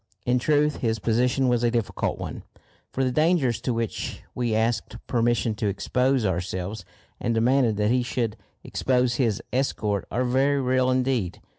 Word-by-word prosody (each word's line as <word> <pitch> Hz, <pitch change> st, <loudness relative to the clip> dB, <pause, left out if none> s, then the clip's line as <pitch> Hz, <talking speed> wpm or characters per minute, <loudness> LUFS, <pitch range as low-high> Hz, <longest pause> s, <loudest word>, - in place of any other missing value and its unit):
In 125 Hz, +1 st, +2 dB
truth, 150 Hz, +2 st, +2 dB
his 115 Hz, -2 st, 0 dB
position 125 Hz, +4 st, +1 dB
was 120 Hz, -1 st, +2 dB
a 120 Hz, -, +4 dB
difficult 115 Hz, -3 st, -1 dB
one, -, -, -6 dB, 0.5 s
for 135 Hz, -, -1 dB
the 130 Hz, -, +1 dB
dangers 155 Hz, -5 st, +2 dB
to 125 Hz, -, -1 dB
which 115 Hz, -2 st, -3 dB
we 120 Hz, -3 st, -1 dB
asked 115 Hz, 0 st, 0 dB
permission 115 Hz, -2 st, +1 dB
to 105 Hz, 0 st, -2 dB
expose 125 Hz, +5 st, +1 dB
ourselves 95 Hz, +2 st, -3 dB, 0.4 s
and 115 Hz, -1 st, -1 dB
demanded 120 Hz, -1 st, +3 dB
that 105 Hz, +1 st, +2 dB
he 125 Hz, 0 st, +3 dB
should 120 Hz, -3 st, -2 dB, 0.3 s
expose 125 Hz, -2 st, +1 dB
his 115 Hz, -7 st, 0 dB
escort 105 Hz, -7 st, -1 dB
are 120 Hz, +6 st, 0 dB
very 135 Hz, +3 st, +2 dB
real 130 Hz, 0 st, +2 dB
indeed. 125 Hz, -8 st, 0 dB
120 Hz, 160 wpm, -25 LUFS, 110-130 Hz, 0.5 s, a